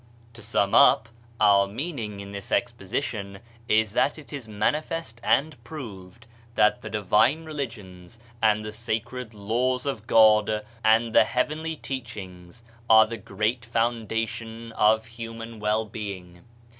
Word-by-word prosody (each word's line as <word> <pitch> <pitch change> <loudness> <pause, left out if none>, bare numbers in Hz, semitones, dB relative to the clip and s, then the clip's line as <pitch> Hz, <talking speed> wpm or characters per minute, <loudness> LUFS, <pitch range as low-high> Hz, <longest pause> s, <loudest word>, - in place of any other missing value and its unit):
To 120 - -12
sum 100 -2 0
up, 120 -3 +6 0.3
our 100 -2 +5
meaning 110 - -5
in 100 0 -9
this 100 -1 -8
exposition 100 -1 -2 0.3
is 110 -1 +2
that 140 - +2
it 150 -2 -12
is 135 -5 -6
manifest 115 +3 -2
and 145 +4 +1
proved 115 - -9 0.3
that 110 +3 +3
the - - -7
divine 110 - +2
religions 115 - -7 0.2
and 105 -1 +3
the 105 - -5
sacred 115 +1 -4
Laws 125 +5 -1
of 130 -6 -4
God 110 -1 +4 0.2
and 110 +1 +3
the - - +6
heavenly 155 +5 -1
teachings 105 - -8 0.3
are 110 0 +8
the 115 +1 -6
great 105 +4 -2
foundation 115 0 -2
of 110 0 +3
human 115 0 -8
well 105 +1 0
being. 95 -5 -8
110 Hz, 130 wpm, -25 LUFS, 105-120 Hz, 0.3 s, are